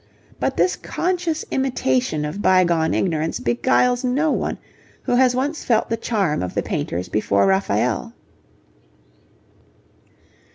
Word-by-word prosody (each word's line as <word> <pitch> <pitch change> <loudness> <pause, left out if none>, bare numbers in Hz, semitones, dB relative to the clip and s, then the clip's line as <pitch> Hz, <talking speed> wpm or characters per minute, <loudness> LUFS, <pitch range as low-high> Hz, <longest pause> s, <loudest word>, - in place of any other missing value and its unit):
But - - -1
this 370 - +2
conscious 345 -3 -2
imitation 155 - 0
of 155 +7 -5
bygone 170 -4 +3
ignorance 160 -3 -1
beguiles 125 - +1
no 280 +5 +1
one - - -2 0.5
who - - -1
has 250 0 +4
once 285 +5 -2
felt 230 -1 +1
the - - +2
charm 205 -9 -1
of 90 -1 -4
the - - 0
painters 90 +2 -3
before 100 -2 +1
Raphael. 95 -9 0
190 Hz, 120 wpm, -21 LUFS, -, 0.5 s, has